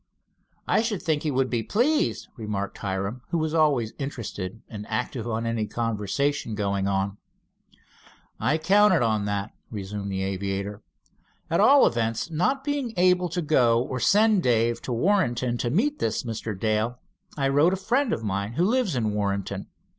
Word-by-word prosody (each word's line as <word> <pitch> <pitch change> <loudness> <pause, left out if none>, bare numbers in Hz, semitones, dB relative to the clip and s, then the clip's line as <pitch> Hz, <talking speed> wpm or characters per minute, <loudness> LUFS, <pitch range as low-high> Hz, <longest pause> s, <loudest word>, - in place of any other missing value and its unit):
"I - - +3
should 225 -4 -2
think 155 -2 +1
he 155 - -1
would 135 -1 +1
be 120 -2 +1
pleased," 250 - +1
remarked 105 -5 -4
Hiram, 100 +5 -3
who 170 - 0
was 160 -1 -1
always 145 -9 +2
interested 115 -7 -5
and 105 -2 -8
active 115 +1 -3
in 115 0 -2
any 115 -2 -1
conversation 115 +3 -1
going 100 -1 -1
on. 100 0 -1 1.2
"I 150 - +2
counted 190 -1 +4
on 110 -3 +1
that," 100 0 -2 0.2
resumed 100 -1 -5
the 95 0 -2
aviator. 100 +1 -3 0.7
"At 165 - +2
all 275 +7 +7
events, 115 +5 -1
not 180 - 0
being 280 -5 -2
able 180 0 +3
to 175 +1 -2
go 120 -6 +3
or 130 +1 -3
send 210 - +4
Dave 115 -3 +1
to - - -5
Warrenton 120 - +1
to 120 - 0
meet 280 - +1
this - - -1
Mr. 110 -4 -5
Dale, 110 +3 0 0.4
I 135 -1 +1
wrote 145 +5 +4
to - - -1
a 190 0 -11
friend 255 +3 +2
of 115 - -2
mine 100 +1 -2
who 170 +8 +2
lives 225 - +1
at 120 - 0
Warrenton. 100 -2 -2
120 Hz, 170 wpm, -25 LUFS, 105-170 Hz, 1.2 s, all